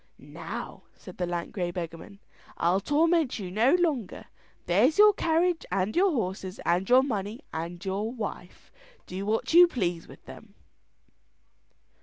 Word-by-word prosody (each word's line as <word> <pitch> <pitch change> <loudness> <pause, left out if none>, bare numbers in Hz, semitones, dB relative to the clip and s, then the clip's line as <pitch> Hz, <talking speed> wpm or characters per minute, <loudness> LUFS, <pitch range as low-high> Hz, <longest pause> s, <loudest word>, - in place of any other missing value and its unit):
"Now," - - -8
said 185 - -13
the 180 - -1
lank 175 -1 -4
grey 180 -3 -2
beggarman, 170 +2 -7 0.4
"I'll 175 +3 +2
torment 320 - +1
you 190 -4 -6
no 235 - +3
longer. 305 - -1 0.4
There's 220 - +3
your 420 0 +7
carriage 335 0 +1
and 195 +2 -1
your 385 +3 +4
horses, 190 - -4
and 180 +3 +1
your 255 +1 +6
money 215 -1 -4
and 170 +3 -6
your 200 +4 -2
wife; 210 -6 -8 0.3
do 185 +2 -6
what 220 +8 -1
you 350 +1 +9
please 180 - -3
with - - -15
them." - - -13
205 Hz, 145 wpm, -27 LUFS, 180-290 Hz, 0.4 s, you